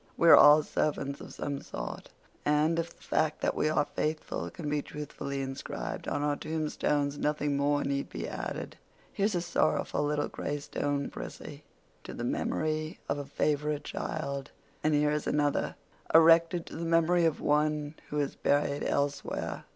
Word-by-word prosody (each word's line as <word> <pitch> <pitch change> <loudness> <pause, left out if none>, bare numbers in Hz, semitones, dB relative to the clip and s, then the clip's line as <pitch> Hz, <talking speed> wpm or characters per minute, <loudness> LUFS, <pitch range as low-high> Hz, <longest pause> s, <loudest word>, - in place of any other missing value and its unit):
We 170 - +5
are - - +12
all 150 +1 +8
servants 140 -2 -1
of - - -9
some 140 -1 -3
sort, - - -6 0.3
and 150 +3 +2
if 170 0 -4
the - - -20
fact 155 -1 0
that - - +1
we 155 - +1
are 150 -1 +2
faithful 155 +1 -3
can 165 -5 -7
be 150 0 0
truthfully 140 -2 -5
inscribed 135 - -5
on 145 - -1
our 145 0 +1
tombstones 150 -2 -1
nothing 150 -1 0
more 145 +1 +2
need 140 0 -1
be - - -5
added. - - -5 0.4
Here's 205 0 +1
a 175 - +1
sorrowful 170 -3 +1
little 145 0 0
gray 145 - -3
stone, 145 0 -2
Prissy—'to 150 -1 -10
the - - -4
memory 155 0 -1
of - - -1
a 145 - -5
favorite 150 +1 0
child.' 140 -3 -4 0.3
And 155 0 +3
here 150 0 +3
is 150 0 -1
another 145 -1 +1 0.4
'erected 165 +1 +6
to - - -8
the 165 - -3
memory 165 +1 +3
of 160 - +1
one 150 0 +1 0.2
who 150 - -1
is 140 -1 -1
buried 145 0 +1
elsewhere. 140 0 -2
150 Hz, 165 wpm, -30 LUFS, 145-155 Hz, 0.4 s, are